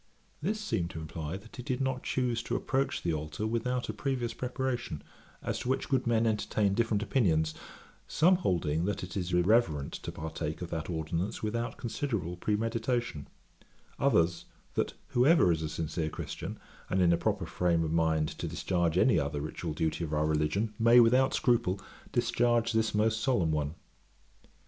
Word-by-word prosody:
This 210 +7 -1
seemed 95 - -1
to 80 - -6
imply 80 +2 -5
that 110 +6 -14
he - - -4
did 125 +1 -2
not 130 -1 -1
choose 120 -3 0
to - - -3
approach 135 +1 -1
the 85 - +1
altar 75 +6 -3
without 120 +3 -1
a 110 - -3
previous 120 +2 -2
preparation, 125 - -3 0.4
as - - -2
to 125 - -4
which 130 - 0
good 130 -3 +1
men 115 -1 +3
entertain 105 -2 +1
different 110 -1 +1
opinions, 80 - +2 0.5
some 180 +4 +4
holding 85 - 0
that 100 -1 -2
it 90 -1 -7
is 90 -2 -2
irreverent 90 -5 +2
to - - -5
partake 80 +1 -4
of 85 - -7
that 80 0 -3
ordinance 85 +6 -2
without 115 +2 -2
considerable 110 - -2
premeditation; 115 - -1 0.7
others, 85 0 +2 0.3
that - - 0 0.2
whoever 130 - +5
is 80 -1 0
a 80 - -2
sincere 80 0 -2
Christian, - - -6 0.3
and 95 - +1
in 85 -2 +5
a - - +5
proper - - -1
frame 85 -2 +1
of 80 - -2
mind 80 -2 +2
to - - -2
discharge 85 -2 0
any 110 -2 +5
other 70 0 -2
ritual 75 +2 -4
duty 80 +2 -1
of 80 -2 -4
our 75 0 +2
religion, 80 +8 0
may, 115 +2 +7
without 125 +3 +5
scruple, 115 -6 +2 0.3
discharge 120 -1 +2
this 110 -1 +1
most 110 +1 +2
solemn 95 -12 +2
one. 75 0 -1
100 Hz, 170 wpm, -30 LUFS, 80-120 Hz, 0.7 s, may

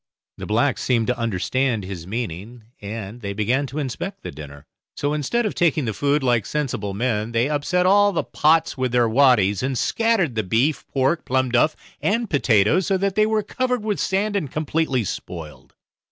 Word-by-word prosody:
The - - -6
blacks - - +1
seemed 115 -3 +1
to 125 0 -1
understand 115 +2 0
his 90 -3 -7
meaning, 110 +1 -5 0.2
and 105 +2 -7
they 100 -2 -4
began 120 +7 0
to 135 +4 -8
inspect 180 +8 -4
the - - -5
dinner; 70 0 -11 0.3
so 145 +1 -1
instead 185 - 0
of 210 - -1
taking 155 -5 +1
the 110 - -2
food 145 +5 +1
like 120 -5 +1
sensible 120 -9 -3
men, 115 0 -1
they 115 +3 +2
upset 165 +5 0
all 205 +2 +5
the 170 - -1
pots 160 +1 +2
with 130 -3 -2
their 120 -1 +4
waddies, 110 -6 +3
and 130 0 -1
scattered 225 - +1
the 110 - 0
beef, 115 +10 0
pork, 135 +5 0
plum 130 -1 0
duff 125 +6 +3 0.3
and 230 +1 0
potatoes, 135 - +3
so 195 -1 +2
that 195 0 0
they 215 +2 +3
were 220 -1 +1
covered 250 +1 -2
with 210 -2 -1
sand 205 +2 0
and 155 -9 -2
completely 155 -4 0
spoiled. 85 -5 -8
130 Hz, 185 wpm, -22 LUFS, 110-170 Hz, 0.3 s, all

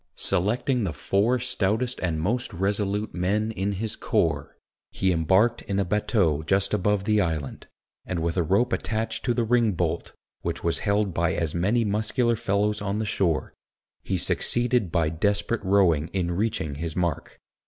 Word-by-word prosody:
Selecting 115 - +1
the 85 -5 -2
four 100 - +1
stoutest 115 +2 -1
and 85 -4 -1
most 120 +9 -1
resolute 100 +3 -1
men 105 +5 0
in 100 -1 -2
his 105 +3 -4
corps, - - -1 0.3
he 95 - 0
embarked 95 +8 +2
in 100 - -3
a 100 - +1
batteau 90 -5 +1
just 100 +5 +1
above 105 0 +1
the 105 0 +2
island, 80 -6 -3 0.4
and 90 - -4
with 80 0 -1
a 90 - +2
rope 100 +9 +1
attached 110 +2 -2
to - - +1
the 120 - +1
ring 115 -2 +2
bolt, 85 -1 -2 0.3
which - - -3
was 85 - 0
held 100 -2 0
by 85 0 +1
as 80 -2 -1
many 105 +7 +1
muscular 110 +4 +1
fellows 105 0 0
on 100 0 -2
the 110 - -1
shore, 90 -6 0 0.5
he - - -2
succeeded 120 -6 +1
by 85 -3 +2
desperate 100 +7 0
rowing 90 -6 +3
in 90 -3 -1
reaching 90 -5 -1
his 85 -2 -4
mark. 85 -4 -2
100 Hz, 165 wpm, -25 LUFS, 85-110 Hz, 0.5 s, rowing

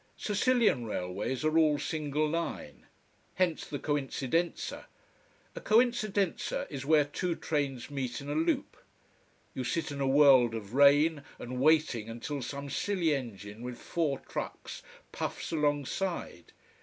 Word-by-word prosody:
Sicilian 210 - +2
railways 105 +8 -3
are 155 0 +1
all 155 -2 +4
single 155 -1 -1
line. 165 +2 -4 0.5
Hence, 180 -4 0
the 145 - -4
coincidenza. 145 +3 -2 0.7
A - - -6
coincidenza 215 -5 +1
is 140 -1 -6
where 155 -2 +5
two 170 +4 -2
trains 140 -5 -2
meet 130 -4 -3
in 140 - -9
a 145 - -2
loop. 160 +2 0 0.8
You 130 - -3
sit 155 +6 -2
in 140 -1 -4
a 135 - +1
world 135 -4 +6
of 110 -1 -7
rain 145 +3 +5 0.2
and 125 +1 -6
waiting 145 -6 +3
until 130 +5 -5
some 140 +3 -5
silly 170 +2 0
engine 110 -5 -6
with 125 0 -6
four 155 -3 -1
trucks - - -6 0.3
puffs - - -4
alongside. 150 +4 -2
145 Hz, 130 wpm, -30 LUFS, 130-165 Hz, 0.8 s, world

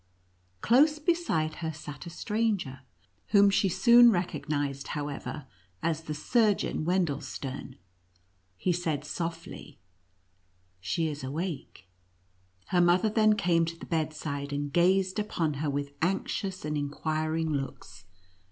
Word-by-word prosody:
Close 295 +6 +5
beside 300 - 0
her 160 -2 -3
sat 150 +1 -9
a - - -5
stranger, 205 - -1 0.5
whom 200 -1 +5
she 195 0 +2
soon 235 +5 +7
recognized, 145 -7 -1
however, 145 -1 -5 0.4
as 160 -1 -1
the 155 - -4
Surgeon 210 0 +1
Wendelstern. 145 -6 -2 0.8
He 180 - 0
said 160 -4 -2
softly, 165 -2 -6 0.5
" 90 0 -41
She 165 -2 +1
is 150 -2 -5
awake 140 - -5 0.4
!" 90 +1 -38
Her 180 -2 +4
mother 175 +5 +4
then 215 0 +4
came 170 -4 +2
to 165 0 -6
the - - -9
bedside, 155 -3 -3
and 145 0 -3
gazed 185 +3 +3
upon 165 -7 -1
her 155 - 0
with 140 0 -3
anxious 190 +1 -1
and 150 0 -2
inquiring 155 +2 -1
looks. 95 -9 -6
160 Hz, 125 wpm, -29 LUFS, 145-190 Hz, 0.8 s, soon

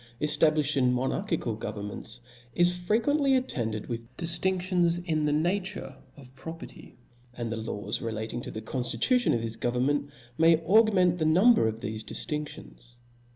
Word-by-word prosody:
Chap. 120 +2 -13
X. 150 - 0
eftablifhed 155 -2 +2
in 125 -2 +3
monarchical 130 - -1
governments, 110 +2 -6 0.3
is 175 0 +3
fre 180 +4 0
quently 275 +3 +3
attended 115 - -3
with 115 -2 -4 0.2
diftinftions 175 0 +1
in 155 -3 0
the 150 - +1
nature 180 +6 -1 0.2
of 130 -2 -14
property 165 +5 -10 0.2
\ 120 0 -31
and 120 -2 -3
the - - -1
laws 110 -2 -4
relative 115 +1 -4
to - - -7
the 110 - -7
conftitution 135 - +1
of 115 - -2
this 115 0 -4
government, 125 +5 0 0.3
may 165 0 +6
augment 185 -3 +4
the 155 - +1
number 180 - +5
of 110 +1 -4
thefe 110 +1 -4
diftinftions. 120 - -6
150 Hz, 155 wpm, -28 LUFS, 115-180 Hz, 0.3 s, may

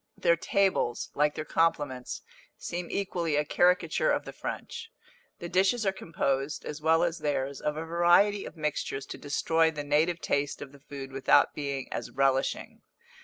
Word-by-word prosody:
Their 170 -1 +3
tables, 185 -8 0
like 150 0 +1
their 155 - -4
compliments, 145 -7 -1 0.3
seem 175 0 -5
equally 175 -5 -1
a 150 0 +1
caricature 180 - +2
of - - 0
the - - -8
French. 455 - -6 0.5
The 170 - -6
dishes 195 +6 +2
are 195 - +3
composed, 145 -5 -2
as 150 0 -6
well 160 +2 +3
as 170 -1 -1
theirs, 140 -2 -2
of 150 0 -2
a 160 - -4
variety 175 +5 +4
of - - -10
mixtures 150 -3 -2
to - - -8
destroy 160 +3 +2
the 150 -2 -5
native 155 +4 +2
taste 145 -1 -1
of 135 - -8
the 140 - -16
food 135 -1 -8
without 135 0 +4
being 140 -2 -4
as - - -4
relishing. 135 0 0
155 Hz, 170 wpm, -28 LUFS, 140-175 Hz, 0.5 s, variety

